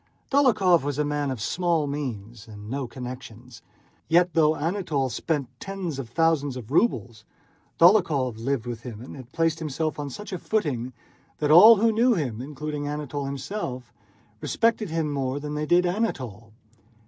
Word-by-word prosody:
Dólokhov 220 Hz, -, +4 dB
was 145 Hz, 0 st, -3 dB
a 150 Hz, -, +1 dB
man 145 Hz, -1 st, -1 dB
of 130 Hz, -3 st, -4 dB
small 170 Hz, +5 st, 0 dB
means 120 Hz, -6 st, -5 dB
and 105 Hz, 0 st, -10 dB
no 135 Hz, -1 st, -3 dB
connections. 125 Hz, -1 st, -9 dB, 0.5 s
Yet, 175 Hz, +1 st, +3 dB
though 155 Hz, -1 st, +4 dB
Anatole 155 Hz, -5 st, -1 dB
spent 140 Hz, +3 st, -2 dB
tens 185 Hz, -7 st, -5 dB
of 125 Hz, -4 st, -6 dB
thousands 145 Hz, -2 st, +1 dB
of 120 Hz, -1 st, -9 dB
rubles, 115 Hz, -, +1 dB, 0.6 s
Dólokhov 160 Hz, -, +4 dB
lived 130 Hz, 0 st, -1 dB
with 120 Hz, -2 st, -5 dB
him 115 Hz, -4 st, -8 dB
and 125 Hz, -, -10 dB
had 130 Hz, -2 st, -12 dB
placed 165 Hz, +1 st, 0 dB
himself 155 Hz, 0 st, -3 dB
on 145 Hz, -1 st, -4 dB
such 210 Hz, +8 st, -8 dB
a 180 Hz, -, -3 dB
footing 140 Hz, -, -1 dB, 0.5 s
that 150 Hz, -1 st, 0 dB
all 210 Hz, +8 st, +10 dB
who 225 Hz, +2 st, +3 dB
knew 235 Hz, +2 st, +3 dB
them, 125 Hz, -, -3 dB
including 145 Hz, +1 st, -5 dB
Anatole 145 Hz, -1 st, -4 dB
himself, 135 Hz, -, -5 dB, 0.5 s
respected 230 Hz, -3 st, +1 dB
him 160 Hz, -2 st, -1 dB
more 135 Hz, 0 st, -2 dB
than 150 Hz, +1 st, -5 dB
they 150 Hz, 0 st, -2 dB
did 175 Hz, +2 st, +4 dB
Anatole. 130 Hz, -, -3 dB
145 Hz, 160 wpm, -25 LUFS, 125-170 Hz, 0.6 s, all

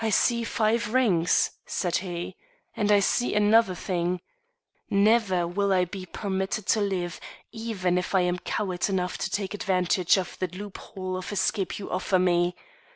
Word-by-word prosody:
"I 225 Hz, -, +1 dB
see 235 Hz, +2 st, +2 dB
five 230 Hz, +1 st, 0 dB
rings," 185 Hz, -10 st, +3 dB, 0.2 s
said 175 Hz, -2 st, 0 dB
he, 175 Hz, -1 st, -5 dB, 0.4 s
"and 210 Hz, -1 st, +1 dB
I 205 Hz, -1 st, +6 dB
see 240 Hz, +3 st, +1 dB
another 210 Hz, -2 st, +4 dB
thing. 180 Hz, 0 st, -1 dB, 0.7 s
Never 200 Hz, -3 st, +3 dB
will 200 Hz, +3 st, 0 dB
I 185 Hz, -1 st, +3 dB
be 185 Hz, +1 st, -8 dB
permitted 190 Hz, +1 st, -3 dB
to 215 Hz, -, +3 dB
live 180 Hz, -4 st, -2 dB, 0.3 s
even 205 Hz, -6 st, -1 dB
if 180 Hz, -, -3 dB
I 190 Hz, -, +5 dB
am 180 Hz, 0 st, 0 dB
coward 185 Hz, -1 st, -2 dB
enough 180 Hz, -2 st, -1 dB
to -, -, -2 dB
take 195 Hz, 0 st, -2 dB
advantage 185 Hz, -2 st, +2 dB
of 185 Hz, -, -4 dB
the 185 Hz, -, 0 dB
loophole 185 Hz, 0 st, -6 dB
of 185 Hz, -, -6 dB
escape 195 Hz, 0 st, -1 dB
you 200 Hz, -, -7 dB
offer 185 Hz, +1 st, +1 dB
me. 175 Hz, -1 st, +2 dB
190 Hz, 160 wpm, -26 LUFS, 180-210 Hz, 0.7 s, I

